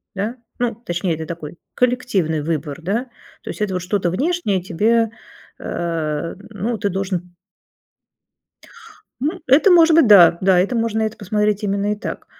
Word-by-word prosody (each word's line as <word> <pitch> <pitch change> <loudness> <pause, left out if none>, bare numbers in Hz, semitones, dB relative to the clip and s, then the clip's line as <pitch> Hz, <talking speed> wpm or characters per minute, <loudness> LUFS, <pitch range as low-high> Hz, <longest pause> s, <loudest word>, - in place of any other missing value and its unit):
да. 210 +5 -3 0.2
Ну 240 -2 0
точнее 175 -6 -2
это 160 0 -6
такой 165 0 -8 0.2
коллективный 225 -11 0
выбор, 150 -1 -3
да. 205 +9 -1 0.4
То - - -8
есть - - -6
это 190 -3 -1
что-то 180 0 -1
внешнее 270 - 0
тебе, 220 +6 +1 0.5
э, 165 -2 -3
ну 220 +2 -3
ты 205 - -1
должен. 185 -2 -4 1.9
Ну 315 +7 -2
это 285 +10 +5
может 335 -2 +6
быть, 320 -4 +6
да, 175 -5 +7
да, 185 -1 +4
это 195 +7 +1
можно 225 -1 0
это 220 0 -2
посмотреть 210 0 -1
именно 200 0 0
и - - 0
так. - - -7
200 Hz, 150 wpm, -20 LUFS, 175-230 Hz, 1.9 s, да